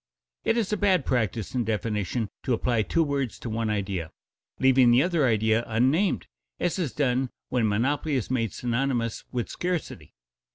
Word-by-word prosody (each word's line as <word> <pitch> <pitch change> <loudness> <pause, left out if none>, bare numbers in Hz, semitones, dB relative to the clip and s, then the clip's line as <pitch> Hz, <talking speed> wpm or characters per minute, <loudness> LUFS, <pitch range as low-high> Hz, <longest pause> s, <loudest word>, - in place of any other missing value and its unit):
It 225 - +2
is 215 -3 0
a - - +1
bad 190 -7 +2
practice 110 -3 -1
in 125 -2 +1
definition 110 0 -1
to 130 - 0
apply 120 0 +1
two 165 +10 +1
words 140 -5 -2
to 115 - -6
one 110 0 -1
idea, 95 -5 -2 0.5
leaving 130 -2 +5
the 120 +3 +5
other 170 -6 +2
idea 110 0 +2
unnamed, 135 - +2 0.3
as 175 - 0
is 160 -8 -1
done 130 -2 0 0.2
when 120 -3 +1
monopoly 140 +8 0
is 125 -1 -2
made 115 -5 0
synonymous 120 -1 -1
with 120 -2 -2
scarcity. 175 - -4
125 Hz, 165 wpm, -26 LUFS, 110-145 Hz, 0.5 s, leaving